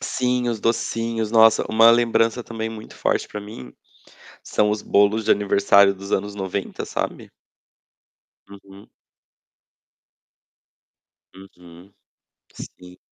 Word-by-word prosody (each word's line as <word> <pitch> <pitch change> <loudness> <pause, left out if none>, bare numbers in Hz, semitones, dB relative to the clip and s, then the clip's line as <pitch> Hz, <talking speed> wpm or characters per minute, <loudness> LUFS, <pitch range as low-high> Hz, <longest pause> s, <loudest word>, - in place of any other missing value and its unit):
Sim, 125 -1 -2
os 115 -3 -3
docinhos. 115 -1 -2
Nossa, 110 -1 +5
uma 115 +1 +5
lembrança 115 0 +1
também 115 -1 -5
muito 110 -1 -11
forte - - -1
pra 105 - -8
mim 100 - -11 0.7
são 105 - 0
os 105 0 -2
bolos 105 +2 +2
de 110 - +2
aniversário 100 0 +3
dos 100 +1 -10
anos 100 +1 -2
90, 95 0 -5
sabe. - - -5 1.2
Uhum. 100 0 -15 2.5
Uhum. 90 -1 -17 0.6
Sim. 90 0 -13
105 Hz, 105 wpm, -21 LUFS, 100-115 Hz, 2.5 s, Nossa